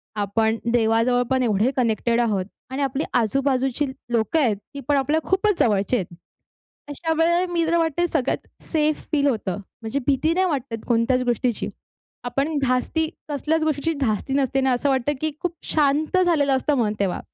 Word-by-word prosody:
आपण 220 +2 +1
देवाजवळ 230 +1 +3
पण 260 -1 +2
एवढे 220 +2 +2
कनेक्टेड 235 0 +1
आहोत 205 -5 0 0.2
आणि 265 +2 -3
आपली 270 +2 -1
आजू-बाजूची 265 +3 +1 0.3
लोकं 235 +7 +1
आहेत, 240 -8 +2
ती 210 +7 -12
पण 290 -1 +3
आपल्या 290 +4 +1
खूपच 385 0 +2
जवळचे 205 +1 +2
आहेत. 190 - -2 0.8
अशा 320 +3 -2
वेळेला 340 +2 +3
मी 335 -1 +1
तर 340 +1 +2
म्हणते 330 +1 +1
सगळ्यात 300 -6 -1 0.2
सेफ 305 -1 0
फील 285 -2 +2
होतं. 210 -8 -1 0.2
म्हणजे 225 +5 -2
भीती 285 +4 +2
नाही 375 +2 +2
वाटत 260 -8 -3
कोणत्याच 245 +2 +2
गोष्टीची. 245 -1 0 0.6
आपण 275 +5 -1
धास्ती 265 +5 0 0.2
कसल्याच 310 +2 0
गोष्टीची 310 +1 0
धास्ती 240 0 -1
नसते 270 -1 +1
ना, 265 0 +2
असं 250 +3 +1
वाटतं 265 +1 +1
की 310 0 0
खूप 350 -2 -2 0.2
शांत 300 +3 +2
झालेलं 290 -6 +3
असतं 285 +3 +1
मन 215 -4 +1
तेव्हा. 195 -3 0
270 Hz, 165 wpm, -23 LUFS, 235-310 Hz, 0.8 s, देवाजवळ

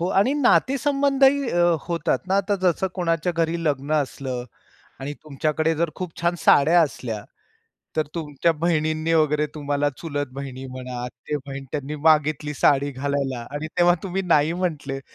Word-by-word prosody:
हो. 175 - 0
आणि 200 +8 +3
नातेसंबंधही 275 0 +3
अ, 175 0 +2 0.2
होतात 170 -1 0
ना, 195 - +2
आता 200 +1 +1
जसं 185 +1 +2
कोणाच्या 170 -1 0
घरी 165 0 0
लग्न 145 -1 -1
असलं 135 -4 -2 0.6
आणि 140 +2 -4
तुमच्याकडे 155 +2 0
जर 165 +1 0
खूप 180 -3 -5
छान 170 +1 +1
साड्या 165 +4 +5
असल्या, 115 -8 -2 0.7
तर 155 - +1
तुमच्या 160 0 0
बहिणींनी 155 -1 +1
वगैरे, 150 -1 +2
तुम्हाला 145 -1 0
चुलत 145 -3 -3
बहिणी 135 -1 -7
म्हणा, 125 -1 -6
आते 125 +4 -5
बहीण, 135 0 -6
त्यांनी 145 0 -3
मागितली 150 -1 +3
साडी 140 0 +3
घालायला 135 -3 -2
आणि 145 +2 -4
तेव्हा 175 0 +5
तुम्ही 195 0 -2
नाही 160 -3 +3
म्हटले. 155 -6 -3
155 Hz, 150 wpm, -23 LUFS, 140-175 Hz, 0.7 s, साड्या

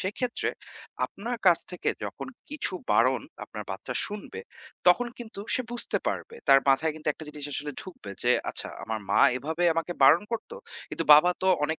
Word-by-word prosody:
সেক্ষেত্রে 235 +6 -2 0.6
আপনার 235 +5 -5
কাছ 175 -2 +7
থেকে 180 - -3 0.2
যখন - - -6 0.2
কিছু 300 -8 -2 0.2
বারণ 125 +3 +3 0.2
আপনার 105 -1 -8
বাচ্চা 95 +6 -5
শুনবে, 210 - -7 0.5
তখন 180 +8 +5
কিন্তু 225 -4 -8
সে 255 - +1
বুঝতে 240 - -1
পারবে। 465 - -3
তার 135 - +9
মাথায় 155 +4 +3
কিন্তু 155 0 -5
একটা 155 - -6
জিনিস 150 -1 -7
আসলে 145 +2 -3
ঢুকবে 175 - -10
যে 120 - +4 0.2
'আচ্ছা - - -3 0.2
আমার 110 0 -3
মা - - +4 0.2
এভাবে 160 +7 -2
আমাকে 165 +2 -2
বারণ 155 +7 +7
করতো। 340 - -4 0.3
কিন্তু - - -3
বাবা 155 +4 +6
তো 190 - +3 0.2
অনেক 160 +2 -2
160 Hz, 175 wpm, -27 LUFS, 135-210 Hz, 0.6 s, তার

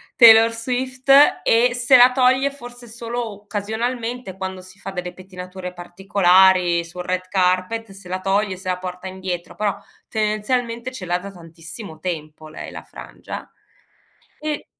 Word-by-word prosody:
Taylor 225 -2 +8
Swift, 255 +3 -2 0.3
e 240 +2 +4
se 245 +1 +5
la 250 +1 +8
toglie 260 +2 +3
forse 245 -3 -11
solo 235 0 -5
occasionalmente 220 +1 -4
quando 190 -1 -5
si 185 +2 -16
fa 195 - -6
delle 180 -1 -5
pettinature 185 -1 -9
particolari, 180 -1 +3
sul 180 +2 -8
red 185 +1 -2
carpet 185 +4 0
se 195 -1 -13
la 185 +1 -4
toglie 195 +1 +1
e - - -8
se 185 0 -6
la 180 - 0
porta 180 0 -7
indietro, 185 -2 -5
però 210 -2 -1 0.3
tendenzialmente 230 +3 -1
ce 190 -7 -7
l'ha 175 +1 0
da 200 +2 -9
tantissimo 165 0 -11
tempo 155 -3 -6
lei 155 - -8
la - - -9
frangia. - - -10 0.9
E 305 -1 -4
195 Hz, 150 wpm, -21 LUFS, 180-235 Hz, 0.9 s, Taylor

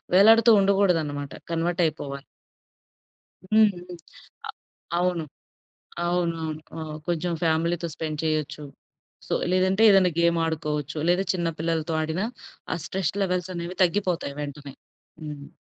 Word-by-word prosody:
వేలాడుతూ 225 +4 +7
ఉండగూడదనమాట. 165 -8 +1 0.2
కన్వర్టయిపోవాలి. 165 -5 -1 1.2
హ్మ్. 215 +2 +5
హ్మ్. 175 - -10
ఆ! 170 -2 -13 0.8
అవును. 180 -2 0 0.8
అవును. 175 -1 0
అవును. 155 -1 -3 0.2
ఆ! 160 - -4 0.3
కొంచుం 175 0 -1
ఫ్యామిలీతో 170 +1 +1
స్పెండ్ 155 -2 -4
చెయ్యచ్చు. 155 -1 -2 0.6
సో - - -2 0.2
లేదంటే, 185 +3 +2
ఏదన్నా 190 -3 +5
గేమాడుకోవచ్చు, 160 -3 0
లేదా 180 +2 +3
చిన్న 170 -2 -1
పిల్లలతో 160 -1 -1
ఆడినా, 160 +6 -1 0.5
ఆ - - -1
స్ట్రెస్ 190 -4 -2
లెవెల్సనేవి 180 -1 -3
తగ్గిపోతాయి 175 -6 0
వెంటనే. 145 -1 -7 0.5
హ్మ్. 145 -2 -8
170 Hz, 105 wpm, -25 LUFS, 155-180 Hz, 1.2 s, వేలాడుతూ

